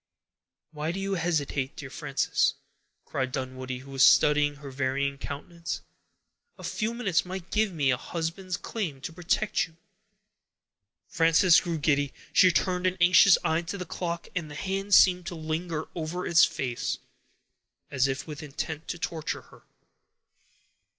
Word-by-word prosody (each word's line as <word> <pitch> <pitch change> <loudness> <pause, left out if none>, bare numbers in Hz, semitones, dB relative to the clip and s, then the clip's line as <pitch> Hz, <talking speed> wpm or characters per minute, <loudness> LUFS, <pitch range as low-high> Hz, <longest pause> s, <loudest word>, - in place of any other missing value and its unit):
"Why 155 +1 -3
do 190 - -4
you 195 0 -2
hesitate, 150 -6 -1
dear 140 -3 -8
Frances?" - - 0 0.5
cried 130 -2 -2
Dunwoodie, 130 -1 -4
who 140 - -11
was 135 -1 -1
studying 150 0 +5
her 140 -1 -10
varying 140 +1 -1
countenance. 170 +5 -6 0.8
"A - - -12
few 225 +1 -2
minutes 195 -8 +1
might 185 -1 -7
give 215 -1 +2
me 145 -6 +1
a 125 - +1
husband's 175 +5 -4
claim 175 -12 -4
to 160 - -6
protect 180 +2 0
you." 165 0 -24 1.3
Frances 165 +1 +5
grew 170 -2 -2
giddy. 145 -2 +1 0.2
She 185 - +7
turned 180 0 +1
an 185 0 -1
anxious 180 +2 +7
eye 160 -1 +1
to 175 +4 -5
the 180 - -5
clock, 170 0 -4
and 165 -4 -2
the 150 - -9
hand 195 +4 +1
seemed 180 -2 +5
to 175 - -4
linger 160 0 -3
over 170 +2 -4
its 170 -1 +6
face, 125 -3 -3 0.9
as 130 -1 +2
if 135 0 -3
with 150 -2 -7
intent 150 +1 -5
to 175 - -4
torture 165 -2 -3
her. - - -18
165 Hz, 150 wpm, -27 LUFS, 140-180 Hz, 1.3 s, She